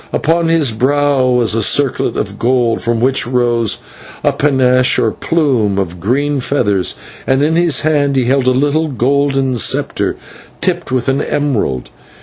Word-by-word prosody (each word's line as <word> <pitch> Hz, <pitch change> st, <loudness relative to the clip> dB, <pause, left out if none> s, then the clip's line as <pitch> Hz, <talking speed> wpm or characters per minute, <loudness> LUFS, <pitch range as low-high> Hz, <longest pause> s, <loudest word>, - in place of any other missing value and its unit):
Upon 165 Hz, +2 st, 0 dB
his 165 Hz, -6 st, +2 dB
brow 140 Hz, +3 st, +1 dB
was 120 Hz, -3 st, +2 dB
a 115 Hz, -, 0 dB
circlet 135 Hz, +6 st, 0 dB
of -, -, -4 dB
gold, 120 Hz, -1 st, +1 dB
from 120 Hz, -1 st, -1 dB
which 130 Hz, +1 st, +1 dB
rose 120 Hz, -3 st, 0 dB, 0.5 s
a -, -, +2 dB
/panache/, 130 Hz, -3 st, +2 dB
or 110 Hz, -, +1 dB
plume, 125 Hz, -13 st, 0 dB
of 90 Hz, -3 st, -3 dB
green 140 Hz, +8 st, 0 dB
feathers, 105 Hz, -8 st, 0 dB, 0.3 s
and 135 Hz, +1 st, +2 dB
in 160 Hz, +2 st, +1 dB
his 170 Hz, -5 st, +2 dB
hand 145 Hz, -3 st, +1 dB
he 130 Hz, -, +2 dB
held 130 Hz, +1 st, +1 dB
a -, -, +5 dB
little 145 Hz, +5 st, +1 dB
golden 135 Hz, -1 st, 0 dB
sceptre -, -, -1 dB, 0.4 s
tipped -, -, -2 dB
with 125 Hz, -2 st, -1 dB
an 135 Hz, +1 st, +1 dB
emerald. 120 Hz, -, -2 dB
130 Hz, 155 wpm, -14 LUFS, 120-145 Hz, 0.5 s, a